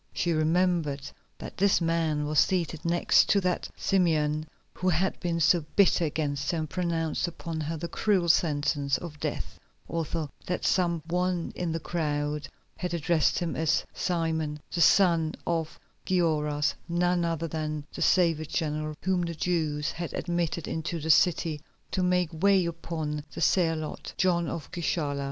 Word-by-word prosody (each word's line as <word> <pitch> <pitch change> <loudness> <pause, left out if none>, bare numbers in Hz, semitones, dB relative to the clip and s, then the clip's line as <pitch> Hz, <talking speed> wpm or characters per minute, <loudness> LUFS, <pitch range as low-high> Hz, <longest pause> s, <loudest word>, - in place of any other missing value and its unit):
She 170 -1 0
remembered 160 -3 +1 0.3
that - - -9
this 200 +1 +4
man 165 -3 0
was 150 0 +2
seated 170 -4 +1
next 170 +1 +3
to 200 - +4
that 180 -1 -1
Simeon 155 -5 +1 0.3
who 185 - 0
had 180 +3 0
been 170 -2 -1
so 165 +1 +4
bitter 190 -4 +4
against 145 -2 -2
her 170 - 0
and 155 -1 -2
pronounced 165 -1 -1
upon 165 -1 -5
her 160 +2 -3
the 170 +2 -4
cruel 190 -2 +1
sentence 145 -3 +2
of 155 -4 -9
death, - - -4 0.3
also 165 -2 -3 0.2
that 180 - -2
some 170 -3 +1
one 180 0 -1
in 175 -2 -2
the 165 - -2
crowd 150 -2 -2 0.3
had 180 -2 -2
addressed 165 -1 +2
him 170 -2 -2
as 160 -1 +1
Simon, 160 -4 -1
the 170 - -1
son 165 -2 +4
of 165 -2 -2 0.3
Gioras, 150 -5 +1 0.2
none 175 +1 +1
other 165 -1 -1
than 155 -2 -3
the - - -6
savage 160 -4 +2
general 155 -1 -1
whom 185 -1 +1
the 170 -1 -3
Jews 155 -3 -1
had 170 0 -5
admitted 170 -2 -2
into 165 +1 -3
the 160 +1 +2
city 160 -1 +3 0.3
to 190 - 0
make 180 -2 +1
way 195 -2 +4
upon 160 -3 -4
the - - -5
Zealot, 165 -4 0
John 175 -3 +2
of 155 - -5
Gischala. 155 -4 -1
165 Hz, 155 wpm, -28 LUFS, 155-175 Hz, 0.3 s, this